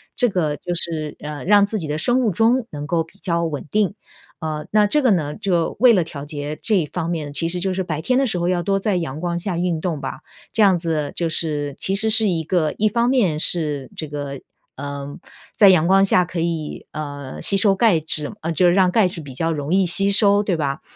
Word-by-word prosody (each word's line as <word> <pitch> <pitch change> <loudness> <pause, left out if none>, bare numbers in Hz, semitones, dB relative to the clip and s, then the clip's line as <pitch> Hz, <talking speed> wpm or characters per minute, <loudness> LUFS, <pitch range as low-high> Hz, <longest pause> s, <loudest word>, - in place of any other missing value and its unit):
这 245 -3 +2
个 155 -6 -1
就 175 -1 -4
是， 160 -3 -3
呃， 150 -2 -6
让 205 +1 +5
自 210 +1 -3
己 155 - -5
的 150 +1 -2
生 245 +9 +1
物 225 - +2
钟 225 +5 +1
能 145 -1 -6
够 165 +2 0
比 165 +4 -21
较 170 -3 -1
稳 150 -3 -4
定。 210 -1 +1 0.5
呃， 155 -1 -4
那 210 0 +4
这 300 +8 +2
个 255 - +3
呢， 150 -5 0
就 180 -5 -1
为 250 -1 +7
了 185 - +3
调 145 -3 -8
节 145 0 -6
这 195 -8 +1
方 165 +2 -4
面， 150 -4 -4
其 165 +2 -1
实 180 +1 -2
就 190 +1 -1
是 190 0 -2
白 155 -3 -4
天 255 +10 +1
的 275 - +1
时 185 - -2
候 175 0 -1
要 180 -1 0
多 195 +3 0
在 200 -1 -1
阳 155 -3 -4
光 175 0 -2
下 175 -1 -3
运 170 -3 -1
动 165 -5 -2
吧， 135 - -5 0.3
这 225 - 0
样 195 -3 +5
子 160 -4 -2
就 170 -2 -1
是 145 -3 -2
其 195 - 0
实 220 +2 +3
是 220 -2 +4
一 165 -2 -1
个 160 -2 0
一 215 +1 +2
方 235 +3 +1
面 195 -13 +1
是 150 -6 +2
这 155 - -5
个， 140 -2 -6 0.3
呃， 140 0 -6 0.4
在 200 -2 +7
阳 170 -3 +4
光 195 +1 +5
下 185 -2 +3
可 175 0 -5
以， 165 -3 -4
呃， 145 -3 -7
吸 200 - +2
收 195 0 +4
钙 195 -5 +3
质 150 -1 -2
嗯， 165 - -3
就 180 +2 +3
是 175 - +4
让 185 -2 +3
钙 210 -3 +3
质 175 -2 -5
比 140 -3 -10
较 165 +5 -1
容 150 +2 -3
易 190 -1 +3
吸 195 +3 +4
收， 205 0 +4
对 185 -5 -1
吧？ 140 -2 -2
170 Hz, 260 characters per minute, -20 LUFS, 150-195 Hz, 0.5 s, 为